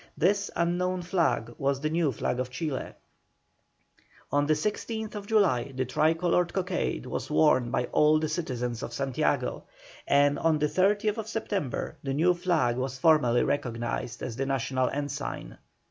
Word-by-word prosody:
This 200 +4 +2
unknown 180 +1 0
flag 165 - 0
was 135 0 +1
the 155 +2 -1
new 165 -3 +2
flag 125 +1 -2
of 130 0 -2
Chile. 130 +1 -4 1.4
On 145 0 +2
the 155 - +3
16th 210 +4 -3
July 170 - +2
the 130 0 0
tricoloured 165 +6 +2
cockade 180 - -2
was - - -4
worn 120 +11 +3
by 125 0 0
all 150 +1 +5
the 155 0 0
citizens 125 -7 -3
of - - -6
Santiago, 135 -1 -1 0.4
and 145 0 +4
on 160 -1 +2
the 150 - +1
30th 205 +6 +1
September 205 - -3
the 135 -1 -2
new 175 +5 +4
flag 170 -9 +1
was 130 0 -3
formally 130 -5 +4
recognised 120 -3 -2
as 115 - -4
the 135 +2 -2
national 130 -1 0
ensign. 145 - -5
150 Hz, 145 wpm, -28 LUFS, 130-175 Hz, 1.4 s, all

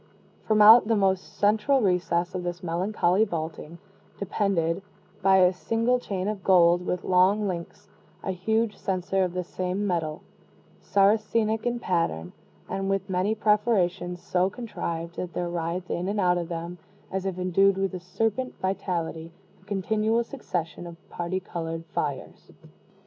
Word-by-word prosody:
From 215 -1 +5
out 220 +1 +9
the 225 - +3
most 190 -2 0
central 215 +7 +3
recess 180 -4 +1
of 185 - -3
this 175 +1 -5
melancholy 180 +3 +1
vaulting, 165 -3 -5 0.4
depended, 195 -4 0 0.4
by 190 0 +5
a 185 0 +5
single 230 +6 0
chain 195 -5 -3
of 210 -3 -3
gold 175 -1 +5
with 180 0 -2
long 190 +3 +3
links, 170 -3 -6 0.4
a 190 - -1
huge 220 +4 0
censer 190 0 -1
of 180 -1 -2
the 180 - -1
same 185 +3 -3
metal, 165 -5 -2 0.6
Saracenic 215 +3 +2
in 240 0 -1
pattern, 165 - -1 0.3
and 195 0 -3
with 195 0 -1
many 190 +4 +1
perforations 205 -5 +1
so 185 +1 +1
contrived 170 -7 -5
that 180 -1 -4
there 175 -1 -2
writhed 170 +1 -3
in 180 +2 -2
and 205 +1 -1
out 180 -2 +3
of 170 0 -5
them, 170 +1 -5 0.3
as 190 0 -2
if 185 -2 -3
endued 190 +2 +3
with 195 0 -1
a 185 - -4
serpent 225 +7 -2
vitality, 170 -4 -3 0.3
a - - -24
continual 215 +3 0
succession 175 - -5
of 170 -1 -10
parti 175 +2 -2
colored 165 -2 -5
fires. - - -4
185 Hz, 150 wpm, -26 LUFS, 175-210 Hz, 0.6 s, out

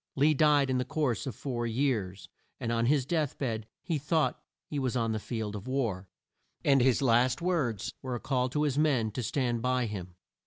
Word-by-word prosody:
Lee 145 +3 +4
died 145 -2 +4
in 130 - +1
the - - +1
course 135 -3 -1
of 130 - -4
four 120 -4 -3
years, 110 -6 -1 0.3
and 115 - -2
on 115 0 +1
his 140 -1 +3
death 155 -2 -1
bed 110 -5 -3 0.2
he 165 -5 -1
thought 155 +2 0 0.3
he 145 - -3
was 130 -2 0
on 115 -1 0
the 110 - -1
field 110 -2 -4
of 105 +3 -7
war, 115 -8 -1 0.6
and 135 -2 +5
his 130 +1 +3
last 120 0 +3
words 160 - -1
were 130 -2 -3
a - - -3
call 130 -1 0
to 150 +4 0
his 145 -1 +1
men 130 -8 +2
to 125 - -3
stand 120 0 -1
by 125 0 +1
him. 95 -5 -6
125 Hz, 205 wpm, -30 LUFS, 115-140 Hz, 0.6 s, and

